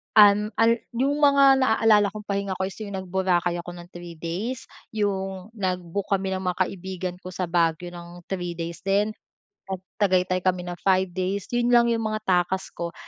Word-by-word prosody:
Um, 210 0 +7
al 230 +1 +4 0.2
'yong 275 +4 +1
mga 280 -2 +6
naalala 220 -4 +4
kong 215 0 -7
pahinga 200 -1 -2
ko 190 - -1
is 190 - -7
'yong 200 -2 -5
nag 190 0 -6
Boracay 175 -2 +1
ako 175 +1 -9
ng 175 0 -11
3 175 -1 -9
days, 190 +10 -4 0.3
'yong 195 -1 -2
nag-book 185 -2 -3
kami 195 -1 0
ng 190 - -2
mga 180 -1 -2
kaibigan 185 -1 -5
ko 185 - -9
sa 185 - -2
Baguio 170 0 0
ng 175 0 -11
3 175 -2 -3
days 170 0 -5
din, 200 +2 +1 0.6
nag 190 -1 -4 0.2
Tagaytay 185 -3 +2
kami 185 0 0
ng 175 0 -6
5 190 -1 +3
days, 185 +3 -3
'yon 240 0 +2
lang 235 0 +5
'yong 230 -1 0
mga 215 0 -2
takas 185 -1 0
ko, 170 0 -5
190 Hz, 190 wpm, -25 LUFS, 175-210 Hz, 0.6 s, Um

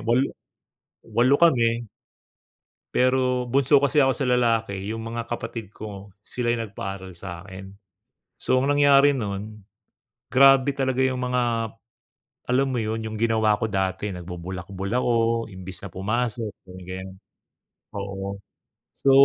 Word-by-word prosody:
8 120 +4 +1 0.7
8 125 +4 +3
kami, 120 -8 +3 1.1
pero 125 -1 +2
bunso 140 +2 +5
kasi 140 +2 +2
ako 135 -2 +5
sa 135 - -1
lalaki 115 -5 +2
'yung 110 +1 -4
mga 115 +1 -4
kapatid 115 -3 -6
ko 100 -2 -9
sila 120 +1 -1
'yung 115 - -2
nagpaaral 95 -2 -6
sa 85 -2 -7
akin. 95 +1 -10 0.6
So 130 - +1
ang 135 - 0
nangyari 145 0 +5
nun, 105 -2 -5 0.7
grabe 135 +1 +6
talaga 130 -2 0
'yung 130 -1 +1
mga, 120 -3 0 0.8
alam 135 +2 +3
mo 130 -2 -1
'yun, 110 +1 -2
'yung 110 0 -5
ginawa 110 -2 +3
ko 110 - -1
dati, 95 +1 -1
nagbubulakbol 90 +2 -6
ako 125 0 +1 0.4
imbis 95 -2 -7
na - - -6
pumasok, 110 +3 -1 0.2
'yung 90 0 -10
ganiyan, 95 +1 -7 0.8
oo. 100 0 -5 0.6
So 135 - +1
115 Hz, 130 wpm, -24 LUFS, 100-125 Hz, 1.1 s, grabe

